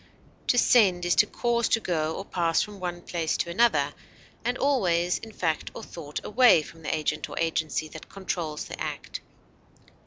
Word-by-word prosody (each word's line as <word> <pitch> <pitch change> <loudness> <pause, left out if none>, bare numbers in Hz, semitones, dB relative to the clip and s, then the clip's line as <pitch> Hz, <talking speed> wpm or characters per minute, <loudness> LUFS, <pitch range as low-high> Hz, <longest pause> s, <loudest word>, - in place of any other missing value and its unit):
To 245 - +3
send 190 -8 +4
is 175 - +3
to 210 - +6
cause 235 0 0
to 225 - +3
go 160 -6 -1
or 195 - -6
pass 170 -4 +1
from 205 -2 -9
one 175 -1 -4
place 165 -4 -1
to 170 - -2
another, 235 +7 +3 0.5
and 245 +1 0
always 180 -11 +2
in 225 - -10
fact 165 -6 -1
or - - -7
thought 150 -3 -6
away 235 -7 +5
from 165 +2 -13
the 155 - -4
agent 155 0 -2
or - - -8
agency 160 -1 -1
that 155 0 -11
controls 170 -5 -4
the - - -8
act. - - -5
175 Hz, 180 wpm, -27 LUFS, 160-215 Hz, 0.5 s, to